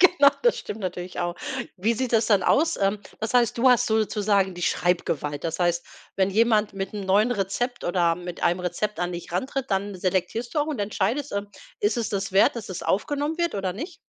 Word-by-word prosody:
Genau, 345 -6 +7
das 485 -1 +3
stimmt 215 - -6
natürlich 180 -1 -4
auch. 175 0 -1 0.4
Wie 215 +5 +1
sieht 255 +1 -2
das 225 -1 +3
dann 205 -4 +4
aus? 325 - +3
Ähm, 200 +1 +1 0.2
was 220 +2 -3
heißt, 240 -2 +3
du 255 +2 +5
hast 245 -1 +4
sozusagen 210 -3 +1
die 175 - -7
Schreibgewalt. 155 -5 0
Das 165 -1 -2
heißt, 175 -1 +1 0.3
wenn 190 0 +2
jemand 215 0 +3
mit 195 -1 -4
'n 205 -2 -4
neuen 205 +5 +3
Rezept 240 +4 -2
oder 175 -1 +2
mit 175 -1 -7
einem 175 +2 +2
Rezept 205 +3 -2
an 175 0 -1
dich 175 - -7
rantritt, 265 +7 -2
dann 200 +1 -1
selektierst 185 +6 -2
du - - +1
auch 295 - 0
und 300 -7 -3
entscheidest, 210 +7 -1
ähm, 200 0 -3 0.3
ist 205 +3 +1
es 230 -3 -1
das 200 -1 -3
wert, 195 +4 +4
dass 220 - -6
es 185 -1 -5
aufgenommen 290 - -1
wird 340 0 0
oder 195 -2 -1
nicht? 315 - -7
205 Hz, 215 wpm, -25 LUFS, 185-240 Hz, 0.4 s, Genau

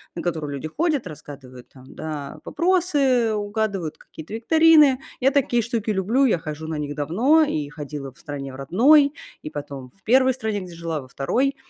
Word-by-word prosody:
на 170 - -4
которые 160 -4 -3
люди 140 +2 -5
ходят, 300 - -1
разгадывают 140 -5 -11
там, 130 -1 -16
да, 150 -3 -6
вопросы, 290 -10 +2
угадывают 205 -5 -2
какие-то 160 +7 -10
викторины. 305 +1 +5 0.2
Я 265 +2 +4
такие 265 -4 +1
штуки 230 -1 -3
люблю, 215 +7 +2
я 230 - +3
хожу 155 -1 -7
на 160 - -3
них 145 -1 -4
давно 200 - +3
и 155 - -2
ходила 145 -2 -7
в 145 - -24
стране 140 -4 -7
в - - -9
родной, 275 - +5 0.3
и - - -6
потом 140 -3 -7
в 195 - -29
1 260 +2 +4
стране, 220 -4 -2
где 180 -3 -9
жила, 165 -2 -4
во 130 - -13
2. 250 - 0
190 Hz, 180 wpm, -23 LUFS, -, 0.3 s, викторины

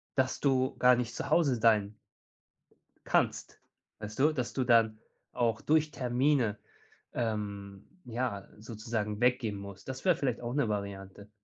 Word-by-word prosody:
dass 130 -1 +1
du 130 -2 +2
gar 125 0 +6
nicht 120 -1 -3
zu 140 - -4
Hause 150 -4 +3
sein 110 -2 +3 1.1
kannst, - - 0 0.4
weißt 105 +1 -8
du? 150 +4 +4
Dass 125 -5 -3
du 130 - -1
dann 115 -3 +4 0.3
auch 115 -3 0
durch 155 0 +2
Termine, 125 -4 +1 0.6
ähm, 100 -3 -4 0.2
ja, 120 -4 -3
sozusagen 110 -1 -4
weggehen 125 -4 +2
musst. 100 -1 -10
Das 130 0 -6
wäre 180 -2 +5
vielleicht 130 -5 -2
auch 120 0 -4
'ne 140 -4 +1
Variante. 100 -1 -5
115 Hz, 140 wpm, -30 LUFS, 105-130 Hz, 1.1 s, gar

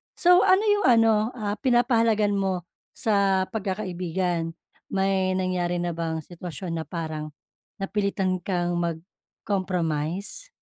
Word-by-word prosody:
So 360 0 +6
ano 375 +3 +5
'yung 415 -2 +2
ano, 225 -1 +4
ah, 210 -3 -3
pinapahalagahan 230 -5 +3
mo 190 -3 0 0.3
sa 200 -4 +2
pagkakaibigan? 180 -5 -2 0.3
May 190 -1 +1
nangyari 180 -1 0
na 175 0 -1
bang 160 -1 -3
sitwasyon 175 0 -7
na 160 - -6
parang 155 -3 -5 0.4
napilitan 195 -2 -1
kang 175 -1 -1
mag-compromise? 175 - -3
190 Hz, 105 wpm, -25 LUFS, 175-210 Hz, 0.4 s, So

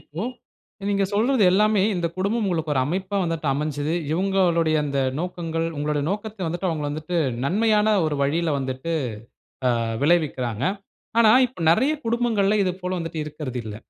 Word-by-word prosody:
இப்போ, 160 +7 -7 0.7
நீங்க 200 -1 +2
சொல்றது 230 +3 +2
எல்லாமே, 210 0 +3
இந்த 170 -1 0
குடும்பம் 205 +4 0
உங்களுக்கு 160 -4 -1
ஒரு 130 - +2
அமைப்பா 190 +6 -2
வந்துட்டு 165 -2 -3
அமஞ்சது. 150 +2 -2 0.2
இவங்காளுடைய 175 -3 +2
அந்த 140 -1 -2 0.2
நோக்கங்கள், 165 -2 -3
உங்களோட 150 0 0
நோக்கத்த 205 -3 -4
வந்துட்டு, 175 +3 -2
அவங்கள 155 -3 -2
வந்துட்டு, 155 +4 -4 0.3
நன்மையான 215 +4 +3
ஒரு 150 - -1
வழியில 160 +3 +1
வந்துட்டு, 130 +4 -3 0.9
ஆ, - - -1 0.2
விளைவிக்கிறாங்க. 135 -8 +1 0.6
ஆனா, 220 -2 +7 0.2
இப்ப 240 - -16
நெறய 255 - +4
குடும்பங்கள்ல, 225 -3 +1
இது 185 - +1
போல 180 - -3
வந்துட்டு 165 -1 -4
இருக்கிறதில்ல. 130 -8 -6
170 Hz, 140 wpm, -23 LUFS, 150-200 Hz, 0.9 s, ஆனா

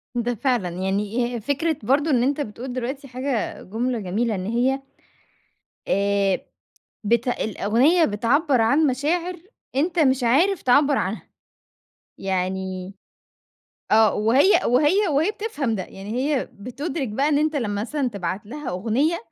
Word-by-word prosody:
ده 240 0 -1
فعلًا، 240 -6 0
يعني 205 +7 -1
آآ - - -3
فكرة 285 +7 -1
برضه 280 +7 +2
إن 245 -3 +3
أنت 285 +3 0
بتقول 245 +1 -6
دلوقتي 260 +3 -4
حاجة 255 -2 -3
جُملة 235 +4 -2
جميلة، 215 +4 -1
إن 185 -1 -4
هي 250 +5 +1 1.1
آآ 200 -1 +1 0.6
بت 235 +3 +1
الأُغنية 245 - +2
بتعَبَّر 250 +5 +2
عن 285 +8 +3
مشاعر 330 +7 -1 0.4
أنت 335 +6 +1
مش 265 -4 +3
عارف 325 +11 +3
تعَبَّر 280 +2 +4
عنها، 195 +4 -3 0.9
يعني 190 0 -3 1.0
آه، 220 -1 +5
وهي 250 - +4
وهي 300 - +3
وهي 310 +5 +2
بتفهم 410 - -3
ده، 195 - -2
يعني 195 +3 -10
هي 270 +1 0
بتُدرِك 265 +6 -4
بقى 270 +8 0
إن 290 -2 +3
أنت 310 0 +1
لمّا 205 -6 -1
مثلًا 275 +3 -1
تبعت 195 -2 -4
لها 295 +6 -7
أُغنية، 235 - 0
245 Hz, 135 wpm, -23 LUFS, 210-285 Hz, 1.1 s, آه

